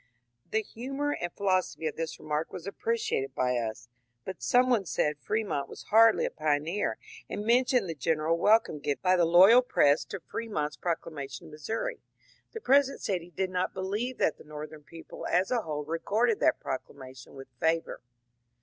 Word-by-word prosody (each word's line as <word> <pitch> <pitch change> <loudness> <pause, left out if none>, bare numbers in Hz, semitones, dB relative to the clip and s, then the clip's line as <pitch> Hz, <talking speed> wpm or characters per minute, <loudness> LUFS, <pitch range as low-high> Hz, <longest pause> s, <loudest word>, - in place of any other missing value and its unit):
The 220 0 0
humour 275 +7 -4
and 175 -11 -3
philosophy 185 -4 0
of 155 - -2
this 165 -1 -4
remark 155 +1 -3
was 175 - -8
appreciated 200 - -2
by 125 0 +1
us, 115 0 -4 0.4
but 190 - -7
some 250 0 +4
one 240 -5 +2
said 150 -4 -1
Fremont 205 -10 -2
was - - -10
hardly 225 0 +6
a - - -2
pioneer, 155 +5 -1 0.3
and 205 - -4
mentioned 250 -2 +3
the 165 - -3
general 160 +2 0
welcome 210 -6 +3
given 145 0 -2
by 185 0 +4
the 175 -2 +3
loyal 190 +9 +7
press 145 - +3
to 195 - -6
Fremont's 205 -9 -4
proclamation 145 -6 -4
in - - -12
Missouri. 155 +9 -4 0.5
The 450 - -7
President 275 -4 +3
said 185 -4 -1
he 170 - -13
did 185 +3 -2
not 180 0 -1
believe 210 +7 -3
that 155 - +1
the - - -12
Northern 150 0 -9
people 165 +2 -9
as 185 +5 +1
a 245 -2 +2
whole 150 -5 -4
regarded 210 +8 0
that - - +3
proclamation 130 -1 -7
with 135 -1 -10
favour. 165 0 0
175 Hz, 175 wpm, -29 LUFS, 150-220 Hz, 0.5 s, loyal